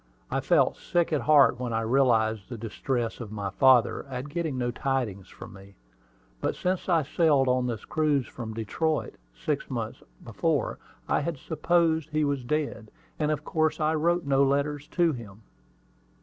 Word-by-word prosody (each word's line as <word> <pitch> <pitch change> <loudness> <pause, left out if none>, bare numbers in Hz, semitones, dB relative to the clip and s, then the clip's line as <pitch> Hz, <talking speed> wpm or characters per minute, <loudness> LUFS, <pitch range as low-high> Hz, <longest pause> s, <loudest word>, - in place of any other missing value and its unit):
I - - +1
felt - - +2
sick 170 -2 0
at 150 - +1
heart 140 0 +5
when 125 -2 -3
I 115 - 0
realized 110 -4 +2
the 120 - -6
distress 115 +1 -3
of 115 -4 -7
my 100 -2 -4
father 130 +2 +4
at 130 +1 -6
getting 160 -3 -2
no 120 -1 -1
tidings 120 -8 -2
from - - -11
me. 100 0 -14 0.6
But - - -1
since 185 +1 -2
I 165 -3 +3
sailed 145 -2 +2
on 125 0 +2
this 115 -4 -4
cruise 150 -4 +1
from 110 -3 -7
Detroit, 150 +8 -1 0.2
six - - -3
months - - -4 0.2
before, - - -1 0.3
I - - +2
had 155 +1 -3
supposed 160 +1 +1
he 155 0 +1
was 140 -3 -1
dead, 145 -5 -2 0.3
and 150 -1 +1
of 155 - -1
course 155 -2 0
I 155 0 +2
wrote 170 +2 +1
no 140 0 +3
letters 145 +1 0
to 175 -2 +2
him. 110 -4 -10
135 Hz, 170 wpm, -27 LUFS, 115-155 Hz, 0.6 s, heart